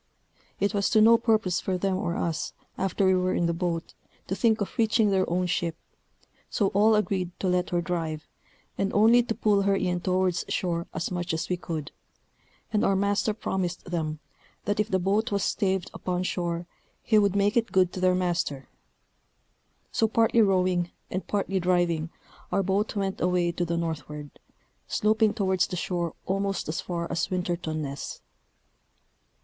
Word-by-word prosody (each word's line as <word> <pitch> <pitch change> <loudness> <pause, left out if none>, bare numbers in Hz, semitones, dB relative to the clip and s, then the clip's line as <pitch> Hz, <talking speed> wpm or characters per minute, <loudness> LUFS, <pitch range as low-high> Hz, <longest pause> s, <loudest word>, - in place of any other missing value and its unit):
It 200 +2 +1
was 200 -1 +1
to 220 - +4
no 225 +2 +7
purpose 215 -6 +1
for 185 -1 -1
them 190 +1 0
or 175 -2 -2
us, 165 -2 -2 0.2
after 195 +1 0
we 190 - +5
were 185 0 +1
in 175 - +1
the 170 - +1
boat, 170 -1 -3 0.3
to 190 - -2
think 220 +2 +2
of 200 - -3
reaching 220 -2 +3
their 190 -1 +2
own 180 +2 +1
ship; 170 -2 -1 0.7
so 200 -3 +1
all 215 +3 +4
agreed 195 -4 0
to 190 - -1
let 180 0 +1
her 175 -2 0
drive, 165 -3 -3 0.5
and 195 0 +1
only 225 +4 +6
to 230 -2 -3
pull 205 -2 +2
her 200 0 +2
in 180 -2 0
towards 185 -1 +1
shore 170 -2 -1
as 160 +3 -3
much 175 -1 -2
as 160 - -3
we 180 - +1
could; 160 -4 -5 0.8
and 210 - +2
our 195 - +3
master 200 +2 +1
promised 190 -4 -3
them, 155 -3 -2 0.5
that 205 0 0
if 210 0 +1
the 190 - +2
boat 205 +6 +1
was 200 -1 0
staved 190 -2 0
upon 180 0 -2
shore, 175 -2 -2 0.4
he 215 -2 +4
would 200 -2 +2
make 205 +1 +2
it 235 -1 +1
good 185 -2 +3
to - - -4
their 185 0 +3
master: 170 -7 -1 1.2
so 225 - +2
partly 225 +1 +3
rowing, 185 -3 +2 0.2
and 185 - -3
partly 195 -1 0
driving, 175 -3 +1 0.4
our 195 - +2
boat 195 +4 0
went 195 -1 -2
away 180 -1 +2
to 175 +1 -2
the 170 0 -1
northward, 150 -3 -4 0.6
sloping 215 0 +2
towards 190 -4 +1
the - - -4
shore 175 -2 -2
almost 195 0 -1
as 155 - -2
far 170 -1 -3
as 170 0 -1
Winterton 175 -4 -2
Ness. 140 0 -6
185 Hz, 175 wpm, -27 LUFS, 175-200 Hz, 1.2 s, no